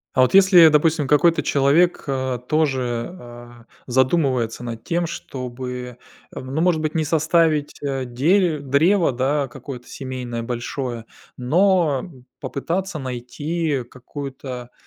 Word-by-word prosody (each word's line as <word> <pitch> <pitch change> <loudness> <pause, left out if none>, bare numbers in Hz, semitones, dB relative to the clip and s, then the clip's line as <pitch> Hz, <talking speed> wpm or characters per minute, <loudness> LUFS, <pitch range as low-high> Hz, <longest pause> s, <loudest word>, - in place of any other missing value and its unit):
А 130 - +4
вот 130 - +3
если, 190 -4 +8
допустим, 155 -1 +2
какой-то 165 +4 +3
человек, 145 +6 +2
э, 130 -2 -2
тоже, 130 -6 0
э, 120 -1 -12 0.4
задумывается 130 -3 +1
над 115 -2 -6
тем, 170 0 -1
чтобы, 125 -4 -6 0.3
ну, 130 +4 -4
может 170 -3 +2
быть, 155 +1 -2
не 160 - +1
составить, 160 -1 +1
э, 135 -2 -2
дере 155 +6 +2
древо, 160 +6 +2
да, 135 +3 0
какое-то 125 0 -9
семейное 125 -3 -5
большое, 120 0 -4 0.3
но 170 +2 +2 0.3
попытаться 175 +5 -3
найти 140 +3 -3
какую-то, 125 0 -8
140 Hz, 115 wpm, -21 LUFS, 125-160 Hz, 0.4 s, если